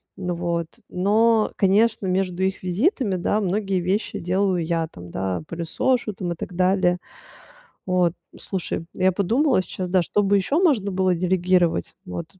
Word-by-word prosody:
ну, 180 -2 -3
вот, 170 -1 -2 0.2
но, 215 +4 +2
конечно, 210 +2 +3
между 185 0 0
их 190 0 -1
визитами, 205 - +1
да, 185 +4 0
многие 195 0 0
вещи 190 +5 -1
делаю 185 0 0
я, 165 -1 -1
там, 90 - -12
да, 95 0 -2
пылесошу, 215 +8 -1
там, 180 -2 -4
и - - -11
так 180 - -7
далее. 185 0 +2 0.9
Вот, 180 -2 +2 0.3
слушай, 180 -3 -4
я 185 0 +2
подумала 225 - +2
сейчас, 185 0 -5
да, 185 0 +3
что 205 - +1
бы 200 +1 +3
ещё 275 - +1
можно 245 - +2
было 185 -1 +1
делегировать. 180 0 +1
Вот, 170 -2 -5
185 Hz, 155 wpm, -23 LUFS, 175-200 Hz, 0.9 s, конечно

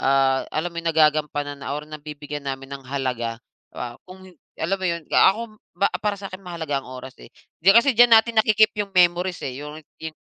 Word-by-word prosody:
ah, 135 0 +2
alam 170 +3 -2
mo - - -13
'yong 165 - -2
nagagampanan 150 -2 +1
na 140 - -5
or 150 - -6
nabibigyan 150 -1 -8
namin 135 +1 -6
ng 135 - -19
halaga 125 -4 -2 0.4
pa 120 -1 -6
kung 185 +1 -13 0.3
alam 175 +5 -1
mo 185 - -1
'yon, 170 -2 -3
ka - - +6
ako 220 - -6 0.6
para 210 -1 -1
sa 195 0 -7
akin 185 - -8
mahalaga 160 -6 -3
ang 130 - -15
oras, 130 0 -9
eh. - - -13 0.3
Di 175 - +2
kasi 235 +5 +5
diyan 240 0 +6
natin 225 0 +4
naki-keep 215 0 +4
'yong 200 -1 -4
memories, 180 0 +3
eh, 130 +1 -5
yung 150 +1 -8 0.2
yun 160 -1 -6
155 Hz, 205 wpm, -23 LUFS, 140-185 Hz, 0.6 s, ka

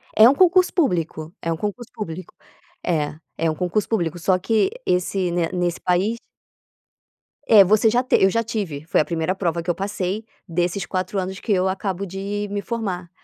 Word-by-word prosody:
É 220 - +9
um 275 - +3
concurso 365 +2 +4
público, 170 - -1
é 165 - -2
um 165 - -1
concurso 210 +6 -5
público. 185 -6 -7 0.5
É 155 -4 0 0.2
é 165 0 +1
um - - -5
concurso 180 +4 -1
público 175 -6 -1
só 185 +2 +2
que 220 - +2 0.2
esse 180 0 0
nesse 175 0 -1
país 190 +6 +1 1.3
É 210 -3 +8
você 215 +3 +4
já 240 +3 +2
te 255 - +3
eu 190 - +6
já 230 +4 0
tive, 200 -11 -4
foi 165 - +3
a - - -1
primeira 165 +2 -1
prova 170 -3 -1
que 175 - -5
eu 175 - +2
passei, 195 +1 -3 0.2
desses 175 +3 -1
4 185 +1 -3
anos 190 +1 -4
que 225 - -4
eu 190 -1 +3
acabo 190 0 -2
de 200 +2 -4
me 205 0 -2
formar. 195 -6 -4
190 Hz, 185 wpm, -22 LUFS, 175-210 Hz, 1.3 s, É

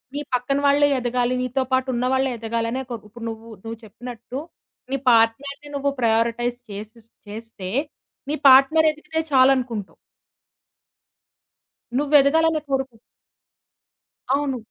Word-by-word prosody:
నీ 290 - -2
పక్కన 250 +3 0
వాళ్ళే 285 +1 +4
ఎదగాలి 245 +1 0
నీతో 255 +1 -1
పాటు 260 0 +2
ఉన్నవాళ్ళే 260 +2 +1
ఎదగాలనే 230 +2 -2
కొ - - -2
ఇప్పుడు 230 +2 -10
నువ్వు 225 0 -9
నువ్వు 225 0 -6
చెప్పినట్టు, 240 +3 -8 0.5
నీ 275 - +1
పార్ట్నర్‌ని 275 +6 +1
నువ్వు 280 0 0
ప్రయారిటైజ్ 230 +1 +1
చేసు 215 +3 -9 0.3
చేస్తే 215 -3 -8 0.6
నీ 300 - 0
పార్ట్నర్ 275 +5 +6
ఎదికితే 320 +1 -5
చాలనుకుంటావు. 255 -6 +2 2.0
నువ్వు 290 +1 -1
ఎదగాలనే 320 +3 +3
కొడుకు 265 -3 -2 1.4
అవును. 280 -2 -1
255 Hz, 110 wpm, -22 LUFS, 230-280 Hz, 2.0 s, పార్ట్నర్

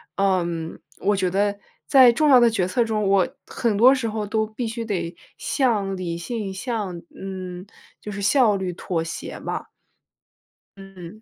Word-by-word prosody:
嗯， 175 -4 -1 0.2
我 205 - +2
觉 185 -2 0
得 200 +2 0 0.3
在 260 -4 +7
重 305 +3 +2
要 255 -2 +8
的 235 -1 +5
决 200 -5 0
策 235 +6 +1
中， 210 -3 0
我 195 -2 +4 0.2
很 230 -3 -1
多 245 +6 +7
时 255 -4 -1
候 215 -1 -3
都 220 +1 0
必 220 +3 -5
须 230 0 -4
得 175 -5 -3 0.2
向 205 -8 0
理 170 -2 -3
性， 200 +1 -4
向 195 -5 -4
嗯， 185 -1 -7 0.3
就 210 - -9
是 200 0 -5
效 220 -1 +4
率 190 -2 -2
妥 170 -1 -3
协 165 - -6
吧。 - - -4 1.1
嗯。 195 +1 -11
200 Hz, 175 characters per minute, -23 LUFS, 185-225 Hz, 1.1 s, 要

